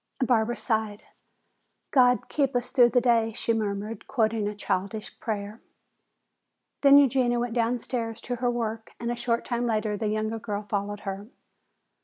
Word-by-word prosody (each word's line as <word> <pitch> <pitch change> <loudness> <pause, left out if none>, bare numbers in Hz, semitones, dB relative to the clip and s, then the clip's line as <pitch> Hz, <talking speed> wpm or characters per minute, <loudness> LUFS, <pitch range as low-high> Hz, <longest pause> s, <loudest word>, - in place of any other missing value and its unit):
Barbara 240 -1 +1
sighed. 220 -3 -2 0.9
"God 250 -2 +4
keep 275 -3 0
us 245 +1 -1
through 245 -3 +6
the 245 - +3
day," 230 -2 +2
she 230 - -1
murmured, 210 0 -3
quoting 220 -4 +1
a 210 - -4
childish 200 +2 -3
prayer. 210 0 -4 1.2
Then 280 0 +8
Eugenia 255 -3 +3
went 240 -1 -2
downstairs 230 -1 -1
to 245 0 -4
her 245 +1 0
work 225 -2 -3
and 235 0 -2
a - - -1
short 235 -1 -1
time 240 0 -1
later 215 -2 0
the 215 +1 -2
younger 215 +1 -1
girl 210 -1 -4
followed 205 0 -3
her. 195 +1 -5
225 Hz, 155 wpm, -26 LUFS, 215-240 Hz, 1.2 s, Then